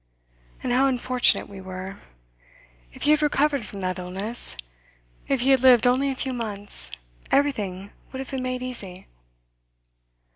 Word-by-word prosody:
'And 245 Hz, -, 0 dB
how 265 Hz, +2 st, +4 dB
unfortunate 255 Hz, -1 st, +2 dB
we 195 Hz, -1 st, -10 dB
were! 190 Hz, +1 st, -7 dB, 0.9 s
If -, -, -10 dB
he 295 Hz, -, +4 dB
had 305 Hz, 0 st, +4 dB
recovered 290 Hz, -4 st, +1 dB
from 200 Hz, -, -8 dB
that 185 Hz, 0 st, -2 dB
illness, 190 Hz, -, 0 dB, 0.7 s
if 270 Hz, -3 st, +1 dB
he 265 Hz, +2 st, +3 dB
had 265 Hz, -, +5 dB
lived 250 Hz, -2 st, +6 dB
only 260 Hz, +3 st, +3 dB
a 270 Hz, -, -2 dB
few 260 Hz, 0 st, -2 dB
months, 205 Hz, -, -1 dB, 0.4 s
everything 205 Hz, -9 st, 0 dB, 0.2 s
would 260 Hz, -, -6 dB
have 265 Hz, 0 st, -6 dB
been 265 Hz, -1 st, -3 dB
made 255 Hz, 0 st, -3 dB
easy. 195 Hz, -8 st, -4 dB
245 Hz, 150 wpm, -24 LUFS, 195-265 Hz, 0.9 s, lived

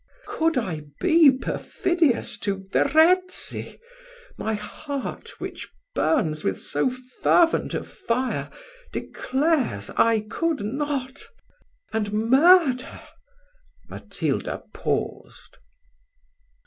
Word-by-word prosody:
Could 325 Hz, -2 st, 0 dB
I 165 Hz, -10 st, -2 dB
be 330 Hz, -4 st, +6 dB
perfidious 285 Hz, +2 st, 0 dB
to 195 Hz, -1 st, -3 dB
Verezzi, 355 Hz, +5 st, +2 dB, 0.6 s
my 220 Hz, 0 st, -2 dB
heart, 275 Hz, +7 st, -6 dB
which -, -, -7 dB, 0.2 s
burns 160 Hz, -, +1 dB
with 95 Hz, -, -1 dB
so 145 Hz, -, 0 dB
fervent 255 Hz, +6 st, +1 dB
a -, -, -2 dB
fire, 255 Hz, +2 st, -2 dB, 0.4 s
declares 265 Hz, -, -1 dB
I 230 Hz, -1 st, +4 dB
could 325 Hz, +4 st, -1 dB
not, 270 Hz, +3 st, -3 dB, 0.7 s
and 210 Hz, -2 st, -1 dB
murder 265 Hz, +4 st, +4 dB, 0.5 s
" -, -, -35 dB
Matilda -, -, -3 dB
paused. -, -, -4 dB
265 Hz, 85 wpm, -24 LUFS, 220-320 Hz, 0.7 s, be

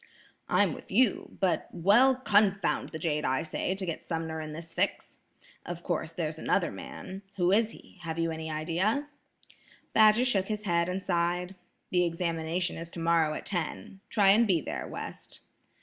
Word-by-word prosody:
"I'm -, -, +3 dB
with -, -, -11 dB
you, 250 Hz, -4 st, +2 dB
but–well–confound 200 Hz, +2 st, +3 dB
the 160 Hz, -, -6 dB
jade, 150 Hz, -2 st, -1 dB
I 130 Hz, 0 st, +1 dB
say, 180 Hz, +3 st, -2 dB
to 190 Hz, -1 st, -3 dB
get 165 Hz, -3 st, -4 dB
Sumner 160 Hz, -1 st, -3 dB
in 155 Hz, 0 st, -6 dB
this 165 Hz, +2 st, -8 dB
fix. -, -, -2 dB, 0.4 s
Of 175 Hz, 0 st, -6 dB
course, 160 Hz, -2 st, -2 dB
there's 160 Hz, -2 st, -3 dB
another 175 Hz, 0 st, +1 dB
man. 190 Hz, +1 st, -8 dB
Who 180 Hz, -1 st, +2 dB
is 220 Hz, +2 st, +4 dB
he? 195 Hz, -, -15 dB
Have 165 Hz, -1 st, -4 dB
you 165 Hz, 0 st, 0 dB
an 160 Hz, -, -5 dB
idea?" 170 Hz, -, -1 dB, 0.8 s
Badger 215 Hz, +3 st, +6 dB
shook 195 Hz, -7 st, +2 dB
his 210 Hz, -1 st, -3 dB
head 170 Hz, -2 st, +1 dB
and 185 Hz, +1 st, -3 dB
sighed. 175 Hz, +1 st, 0 dB, 0.4 s
"The 180 Hz, -1 st, +3 dB
examination 170 Hz, 0 st, -1 dB
is 165 Hz, 0 st, -7 dB
tomorrow 165 Hz, -2 st, +1 dB
at -, -, -6 dB
ten. 180 Hz, +1 st, -3 dB
Try 205 Hz, -3 st, +4 dB
and 220 Hz, +4 st, +6 dB
be 180 Hz, -4 st, +3 dB
there, -, -, -5 dB
West." -, -, -8 dB
175 Hz, 165 wpm, -29 LUFS, 165-200 Hz, 0.8 s, Badger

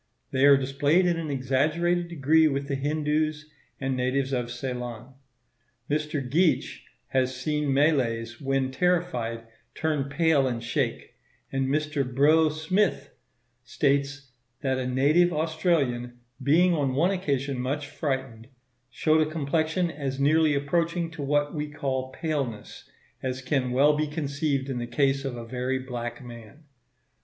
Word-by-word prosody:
They 135 Hz, +1 st, +4 dB
are 140 Hz, -1 st, +8 dB
displayed 145 Hz, +6 st, +2 dB
in 175 Hz, -1 st, +2 dB
an 165 Hz, -2 st, -4 dB
exaggerated 155 Hz, +7 st, +1 dB
degree 160 Hz, 0 st, +3 dB
with 140 Hz, -1 st, -2 dB
the 140 Hz, -, -2 dB
Hindoos 150 Hz, +2 st, -1 dB, 0.3 s
and 135 Hz, -1 st, -1 dB
natives 130 Hz, +2 st, 0 dB
of 120 Hz, -2 st, -1 dB
Ceylon. 125 Hz, 0 st, -6 dB, 0.8 s
Mr. 150 Hz, -3 st, -1 dB
Geach 165 Hz, +6 st, +1 dB, 0.2 s
has 130 Hz, -1 st, 0 dB
seen 150 Hz, 0 st, -1 dB
Malays 120 Hz, -5 st, +1 dB
when 135 Hz, -1 st, 0 dB
terrified 130 Hz, -8 st, 0 dB, 0.3 s
turn 155 Hz, -3 st, 0 dB
pale 145 Hz, -2 st, +3 dB
and 120 Hz, -2 st, -3 dB
shake; 115 Hz, -, -2 dB, 0.4 s
and 135 Hz, -1 st, 0 dB
Mr. 150 Hz, 0 st, 0 dB
Brough 145 Hz, +5 st, +4 dB
Smyth 160 Hz, -1 st, 0 dB, 0.5 s
states 140 Hz, +1 st, -1 dB, 0.3 s
that 130 Hz, -2 st, 0 dB
a 125 Hz, -, -2 dB
native 145 Hz, +8 st, +3 dB
Australian 150 Hz, -7 st, 0 dB, 0.2 s
"being 175 Hz, +5 st, +4 dB
on 140 Hz, -5 st, 0 dB
one 170 Hz, +7 st, +3 dB
occasion 140 Hz, -8 st, -1 dB
much 140 Hz, +4 st, -2 dB
frightened, 135 Hz, -6 st, -4 dB, 0.4 s
showed 155 Hz, +5 st, +2 dB
a 155 Hz, -, +1 dB
complexion 160 Hz, +3 st, 0 dB
as 140 Hz, -3 st, -4 dB
nearly 155 Hz, +1 st, +3 dB
approaching 165 Hz, +4 st, 0 dB
to 165 Hz, -2 st, -8 dB
what 145 Hz, +1 st, 0 dB
we 150 Hz, -1 st, -3 dB
call 130 Hz, -3 st, -3 dB
paleness, 135 Hz, -9 st, -4 dB, 0.3 s
as 130 Hz, 0 st, -3 dB
can 130 Hz, -1 st, 0 dB
well 140 Hz, +4 st, +4 dB
be 155 Hz, +1 st, 0 dB
conceived 145 Hz, -2 st, -2 dB
in 130 Hz, -3 st, -3 dB
the 120 Hz, -, -4 dB
case 135 Hz, +2 st, +1 dB
of 135 Hz, -3 st, -4 dB
a 115 Hz, -, -7 dB
very 125 Hz, +2 st, -2 dB
black 120 Hz, -2 st, -6 dB
man." 120 Hz, +4 st, -12 dB
140 Hz, 140 wpm, -26 LUFS, 130-155 Hz, 0.8 s, are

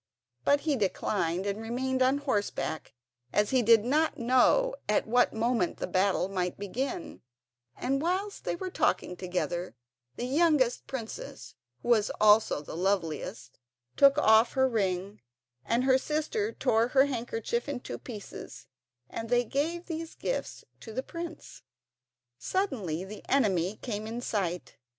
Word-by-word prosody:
But 285 Hz, 0 st, +3 dB
he 305 Hz, -3 st, +1 dB
declined, 190 Hz, -4 st, -1 dB
and 200 Hz, +2 st, -2 dB
remained 260 Hz, +3 st, -2 dB
on 260 Hz, +2 st, +4 dB
horseback, 205 Hz, -, -2 dB, 0.4 s
as 210 Hz, 0 st, +2 dB
he 260 Hz, -1 st, +4 dB
did 225 Hz, -1 st, +5 dB
not 305 Hz, +5 st, +2 dB
know 260 Hz, -, +3 dB, 0.2 s
at 210 Hz, -, +2 dB
what 245 Hz, +2 st, +3 dB
moment 225 Hz, -4 st, 0 dB
the -, -, -2 dB
battle 185 Hz, -1 st, +1 dB
might 180 Hz, -2 st, -2 dB
begin; 265 Hz, -, -4 dB, 0.6 s
and 275 Hz, +2 st, 0 dB
whilst 375 Hz, +5 st, -2 dB
they -, -, -1 dB
were 375 Hz, -, -6 dB
all -, -, -17 dB
talking 180 Hz, -, 0 dB
together 180 Hz, -1 st, -3 dB, 0.4 s
the 245 Hz, -, -3 dB
youngest 275 Hz, -3 st, +2 dB
princess, 235 Hz, -4 st, -7 dB, 0.3 s
who -, -, -4 dB
was 220 Hz, -3 st, +4 dB
also 215 Hz, -6 st, +5 dB
the -, -, -8 dB
loveliest, 170 Hz, -8 st, -2 dB, 0.4 s
took 280 Hz, 0 st, +6 dB
off 220 Hz, -4 st, +5 dB
her 265 Hz, 0 st, +3 dB
ring, 195 Hz, -4 st, -1 dB, 0.4 s
and 235 Hz, +2 st, +1 dB
her 260 Hz, 0 st, +4 dB
sister 315 Hz, -, -1 dB
tore 225 Hz, -, +2 dB
her 265 Hz, +2 st, +4 dB
handkerchief 235 Hz, -1 st, -3 dB
in 280 Hz, -3 st, -3 dB
two -, -, -7 dB
pieces, 210 Hz, -, -9 dB, 0.4 s
and 225 Hz, +9 st, -6 dB
they 245 Hz, 0 st, +3 dB
gave 320 Hz, +8 st, -2 dB
these 325 Hz, -1 st, -5 dB
gifts -, -, -4 dB
to 225 Hz, -, -10 dB
the 260 Hz, -, -2 dB
prince. 335 Hz, +1 st, -8 dB, 0.8 s
Suddenly 220 Hz, -, -1 dB
the 205 Hz, +2 st, -9 dB
enemy 195 Hz, -8 st, +2 dB
came 215 Hz, -2 st, -5 dB
in 230 Hz, +2 st, -4 dB
sight. 185 Hz, -7 st, -3 dB
235 Hz, 145 wpm, -29 LUFS, 200-275 Hz, 0.8 s, took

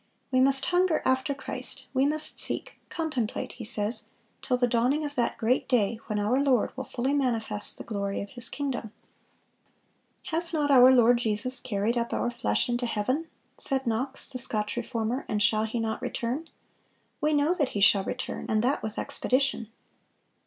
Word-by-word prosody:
"We 255 Hz, -1 st, +3 dB
must 270 Hz, +1 st, +2 dB
hunger 355 Hz, -2 st, +2 dB
after 260 Hz, +2 st, +1 dB
Christ, 265 Hz, 0 st, -6 dB
we 265 Hz, +1 st, +3 dB
must 310 Hz, +1 st, -1 dB
seek, -, -, +1 dB
contemplate," 285 Hz, -9 st, -3 dB
he 245 Hz, -, -9 dB
says, 210 Hz, +1 st, +2 dB, 0.3 s
"till 250 Hz, -, 0 dB
the 245 Hz, -, +3 dB
dawning 245 Hz, +6 st, +1 dB
of 290 Hz, -, -5 dB
that 245 Hz, -4 st, -1 dB
great 240 Hz, +5 st, 0 dB
day, 225 Hz, -3 st, +2 dB
when 215 Hz, -2 st, -2 dB
our 210 Hz, +6 st, +1 dB
Lord 260 Hz, -5 st, +2 dB
will 265 Hz, 0 st, -5 dB
fully 260 Hz, +2 st, -2 dB
manifest 225 Hz, -7 st, -1 dB
the -, -, -7 dB
glory 200 Hz, -3 st, -3 dB
of 200 Hz, -, -6 dB
His 240 Hz, -2 st, -2 dB
kingdom."(472) 260 Hz, -7 st, -10 dB
"Has 335 Hz, +1 st, +1 dB
not 295 Hz, -2 st, +1 dB
our 255 Hz, -1 st, +8 dB
Lord 240 Hz, -1 st, +5 dB
Jesus 235 Hz, +3 st, 0 dB
carried 230 Hz, 0 st, -1 dB
up 235 Hz, -, -3 dB
our 240 Hz, -, 0 dB
flesh 105 Hz, -, 0 dB
into 240 Hz, 0 st, -1 dB
heaven?" 255 Hz, +9 st, -1 dB, 0.3 s
said 270 Hz, -1 st, 0 dB
Knox, 245 Hz, +4 st, -1 dB
the 255 Hz, -, -6 dB
Scotch 210 Hz, -4 st, 0 dB
Reformer, 240 Hz, +1 st, -2 dB
"and 210 Hz, -, 0 dB
shall 215 Hz, +1 st, +3 dB
He 225 Hz, +2 st, -3 dB
not 225 Hz, -1 st, -2 dB
return? 260 Hz, +8 st, -3 dB, 0.7 s
We 305 Hz, +1 st, +2 dB
know 295 Hz, +3 st, +3 dB
that 300 Hz, -7 st, 0 dB
He -, -, 0 dB
shall 200 Hz, 0 st, +5 dB
return, 255 Hz, -, -5 dB
and 215 Hz, 0 st, +1 dB
that 265 Hz, +4 st, +1 dB
with 220 Hz, 0 st, -5 dB
expedition." 260 Hz, -3 st, 0 dB
245 Hz, 175 wpm, -27 LUFS, 220-275 Hz, 0.7 s, our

